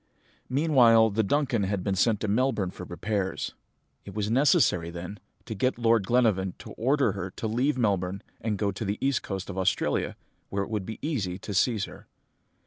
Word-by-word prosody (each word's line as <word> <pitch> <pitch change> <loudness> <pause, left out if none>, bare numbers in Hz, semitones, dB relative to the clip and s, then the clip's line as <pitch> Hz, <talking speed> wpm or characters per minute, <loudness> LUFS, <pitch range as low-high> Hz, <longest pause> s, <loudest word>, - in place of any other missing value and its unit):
"Meanwhile 125 -6 +5
the 110 +3 +1
Duncan 125 +1 +1
had 95 -1 -1
been 100 - 0
sent 105 +2 +2
to 110 - -1
Melbourne 105 -3 +1
for 90 - -9
repairs. 95 +2 -3 0.5
It 100 - -10
was 105 0 -1
necessary, 115 - +3
then, 90 +4 -7 0.3
to 115 - -5
get 125 +5 0
Lord 115 -4 +2
Glenarvan 105 -7 +2
to - - -10
order 135 0 +2
her 95 -1 -4
to 100 - -7
leave 130 +6 +1
Melbourne 100 -4 0 0.2
and 110 -1 -2
go 100 0 0
to 100 - -5
the 100 0 -2
east 135 -1 +1
coast 95 -1 -5
of 95 - -4
Australia, 95 0 0 0.3
where 100 0 -1
it 100 - -8
would 105 -4 -2
be 110 - -5
easy 105 - -2
to 100 +2 -7
seize 105 +1 +2
her. - - -13
105 Hz, 190 wpm, -27 LUFS, 95-120 Hz, 0.5 s, Meanwhile